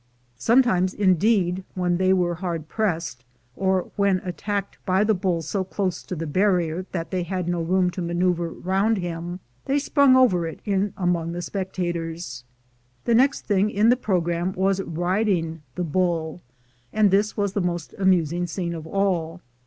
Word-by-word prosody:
Sometimes, 190 - +3
indeed, 190 -1 +2
when 180 -1 +1
they 185 +1 +2
were 180 -2 +2
hard 170 -3 -4
pressed, 165 - -2 0.3
or 190 -1 0
when 200 -2 +3
attacked 200 +2 -4
by 190 +1 +2
the 215 +1 +3
bull 180 -4 -1
so 195 +4 -1
close 185 -1 -2
to 185 - -6
the 165 0 -4
barrier 180 +1 +1
that 165 -2 -4
they 185 -1 0
had 180 0 -3
no 175 -1 0
room 180 +2 +2
to 180 - -5
maneuver 175 0 0
round 195 +6 0
him, 175 0 -5 0.2
they 275 - +1
sprang 280 -2 +4
over 185 -10 +4
it 160 - -7
in 200 -1 0
among 170 -2 0
the 175 - -4
spectators. 170 -8 -4 0.6
The 235 - +2
next 260 +4 +3
thing 205 0 +1
in 215 +2 +3
the 245 - +6
program 175 -5 -1
was 195 0 +1
riding 175 -1 -1
the 180 - -2
bull, 170 -1 -1 0.5
and 210 -2 +3
this 205 +2 +2
was 200 -2 0
the 200 - 0
most 175 -2 -3
amusing 175 -2 +2
scene 170 0 -3
of 160 -1 -7
all. 180 -3 0
185 Hz, 165 wpm, -24 LUFS, 170-195 Hz, 0.6 s, the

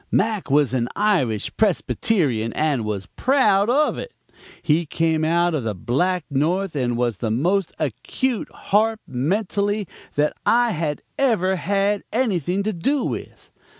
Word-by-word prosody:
Mac 215 -5 0
was 140 -2 +3
an 120 -2 0
Irish 165 - +1
Presbyterian, 160 - +1
and 150 -6 0
was 100 -3 -3
proud 215 - +2
of 295 +4 +2
it; 480 - -7 0.5
he 160 +2 +2
came 160 0 0
out 170 +2 +2
of 150 -5 -1
the 110 -2 -2
Black 170 - 0
North 165 +6 0
and 120 -4 0
was 120 -4 -1
the 115 - -1
most 175 - +1
acute 215 - -2
harp, 220 +2 +1
mentally, 200 - -1 0.3
that 150 +1 +2
I 240 0 +3
had 155 -4 -2 0.2
ever 210 -9 +2
had 200 +2 0
anything 200 - 0
to 215 +1 -1
do 270 - 0
with. - - -6
175 Hz, 145 wpm, -22 LUFS, 140-210 Hz, 0.5 s, was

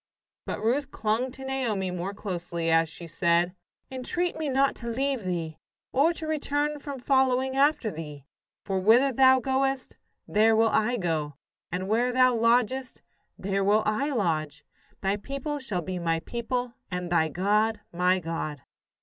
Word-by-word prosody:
But - - -4
Ruth 265 +5 +1
clung 225 +2 -1
to 265 0 -9
Naomi 230 -9 -1
more 180 +3 -4
closely, 175 -4 -3
as 165 0 +3
she 170 +2 -10
said: 170 +1 +1 0.4
"Entreat 340 +8 -2
me 310 -2 -2
not 270 +1 +3
to 235 - -7
leave 265 0 -1
thee, 170 -4 -3 0.3
or 290 +6 +4
to 330 - -6
return 295 -1 -1
from 280 -2 -6
following 260 0 +2
after 275 -5 +2
thee: 150 -3 -8 0.4
for 195 -1 -1
whither 235 +8 +5
thou 260 +1 +6
goest, 265 +1 -1 0.3
there 220 +1 +4
will 225 0 +4
I 220 +3 +1
go; 160 -6 -2 0.4
and 185 +2 -3
where 235 +4 +2
thou 255 0 +4
lodgest, 240 +3 +1 0.3
there 195 +1 -1
will 210 +2 +3
I 215 +8 0
lodge. 165 - -1 0.4
Thy 195 +1 0
people 275 +6 -4
shall 200 -10 -3
be 185 +2 -4
my 165 -1 0
people, 245 +3 -3 0.2
and 180 -1 -4
thy 160 -2 +3
God 210 +6 +1
my 180 +2 +3
God." 165 -5 -4
220 Hz, 160 wpm, -27 LUFS, 180-265 Hz, 0.4 s, thou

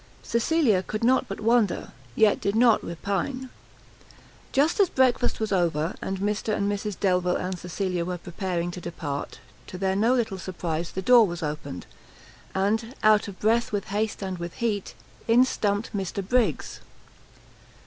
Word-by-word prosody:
Cecilia 235 - +2
could 215 +4 -5
not 260 +2 +3
but - - -6
wonder, 225 -3 +1 0.2
yet 215 -2 +4
did 200 - 0
not 230 -1 +4
repine. 200 +9 -3 1.0
Just 300 +8 +2
as 390 -4 +5
breakfast 255 -2 +2
was 220 -1 -2
over, 170 -3 +1
and 195 - -3
Mr 210 +2 -1
and 200 - 0
Mrs 205 -1 -3
Delvile 180 -2 +2
and 185 0 -3
Cecilia 180 0 -2
were 180 +1 -3
preparing 175 0 -3
to 180 - -8
depart, 160 -5 -5 0.3
to 180 - -7
their 190 0 0
no 225 +6 +3
little 220 -6 -1
surprise, 170 -2 -3
the 190 - -3
door 235 0 +7
was 175 -1 -5
opened, 150 - -5 0.7
and, 220 +6 0
out 215 -1 +5
of 195 -2 -9
breath 230 +2 +2
with 205 -1 -3
haste 210 0 -2
and 190 -2 -4
with 170 0 -6
heat, 215 -4 -2 0.3
in 235 +2 +6
stumpt 205 -3 -1
Mr 195 0 -3
Briggs! 230 - 0
200 Hz, 160 wpm, -26 LUFS, 180-225 Hz, 1.0 s, door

